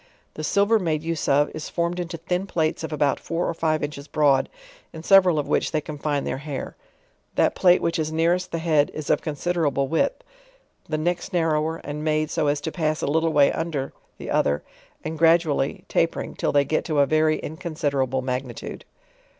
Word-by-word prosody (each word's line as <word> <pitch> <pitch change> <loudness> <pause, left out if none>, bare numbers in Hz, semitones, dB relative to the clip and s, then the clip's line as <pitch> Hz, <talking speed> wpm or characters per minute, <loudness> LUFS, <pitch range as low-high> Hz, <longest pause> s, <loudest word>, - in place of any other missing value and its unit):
The 155 - -6
silver 200 +7 +3
made 160 -5 -1
use 165 -1 -2
of, 145 +2 +3
is 155 - -6
formed 170 +1 -1
into 175 -1 -4
thin 180 +4 -2
plates 160 -3 -1
of 160 - -4
about 145 -2 +1
four 170 +1 -2
cr - - -1
five 155 -2 +1
inches 145 0 -5
broad, 145 -3 +2 0.4
in 160 - -9
several 185 -3 +6
of 145 - -1
which - - +1
they 155 - +1
confine 150 -1 -3
their 130 - -3
hair. 145 -2 -6 0.6
That - - +3
plate 180 -1 +4
which 165 -1 0
is 155 0 -1
nearest 170 +3 +1
the 165 - -1
head 160 -3 +2
is 155 -2 -2
of - - +2
considerable 155 -3 -1
width; 165 - 0 0.7
the 155 - 0
next 175 +3 -2
narrower, 160 -2 +1
and 150 +1 -5
made 155 0 0
so 160 -3 0
as 145 0 +1
to 160 - -3
pass 155 -3 -1
a - - +2
little 160 +3 +1
way 145 -2 +5
under 155 -5 -3 0.2
the - - -7
other, 70 0 +1 0.4
and 160 0 -5
gradually 165 -2 +2
tapering - - 0
till - - -1
they 145 -1 +3
get 155 +3 0
to 155 -3 -1
a 140 - +5
very 155 +1 +2
iri. 155 - -5
considerable 140 -6 -1
magnitude 125 -1 -5
155 Hz, 195 wpm, -24 LUFS, 145-165 Hz, 0.7 s, several